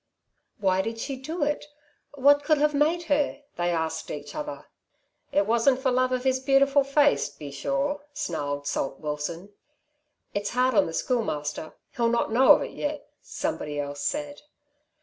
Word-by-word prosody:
"Why 190 -2 +2
did 225 +3 -4
she 270 +4 -4
do 300 +6 -4
it? 295 +1 0 0.5
What 285 +1 +5
could 310 0 +3
have 300 +1 +2
made 315 +4 +2
her," 290 -2 0
they 175 0 0
asked 160 -2 -2
each 145 0 -6
other. 145 -1 -6 0.7
"It 200 - +2
wasn't 235 +4 +3
for 265 -1 +1
love 255 +1 +2
of 255 -1 -1
his 260 -1 +2
beautiful 275 +1 +4
face, 285 - +3
be 145 0 -9
sure," 280 - -2
snarled 145 - -3
Salt 135 -1 -2
Watson. 160 +6 -5 0.8
"It's 205 0 -2
hard 255 +1 +2
on 200 -3 +4
the 165 - -6
Schoolmaster. 155 - -2 0.2
He'll 235 -1 +2
not 235 -1 0
know 255 +4 +7
of - - +1
it - - -6
yet," 295 0 -4
somebody 150 - -4
else 145 0 -4
said. 290 0 -3
250 Hz, 165 wpm, -26 LUFS, -, 0.8 s, know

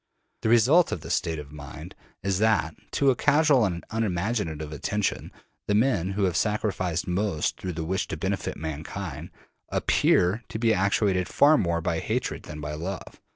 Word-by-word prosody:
The 110 - 0
result 125 +10 +5
of 85 - -3
this - - -3
state 80 -2 -1
of 75 -1 -8
mind 75 -2 -9 0.3
is 95 -1 0
that, 105 -7 +2 0.2
to 140 -1 +4
a - - 0
casual 145 -3 +4
and 85 -3 -3
unimaginative 90 -7 -2
attention, 105 +8 -2 0.4
the 105 - +2
men 105 -6 +2
who 100 +1 0
have 90 -3 +1
sacrificed 95 -3 0
most 90 -3 -1
through 90 - -3
the 80 -1 -4
wish 95 +3 -1
to - - -4
benefit - - -2
mankind 80 -1 -5 0.4
APPEAR 100 +7 +2
to - - -4
be 115 0 +3
actuated 100 -1 +1
far 150 +2 +5
more 85 - +1
by - - -1
hatred - - -2
than 75 0 -8
by 75 0 -5
love. 90 +5 -6
95 Hz, 170 wpm, -26 LUFS, 80-110 Hz, 0.4 s, result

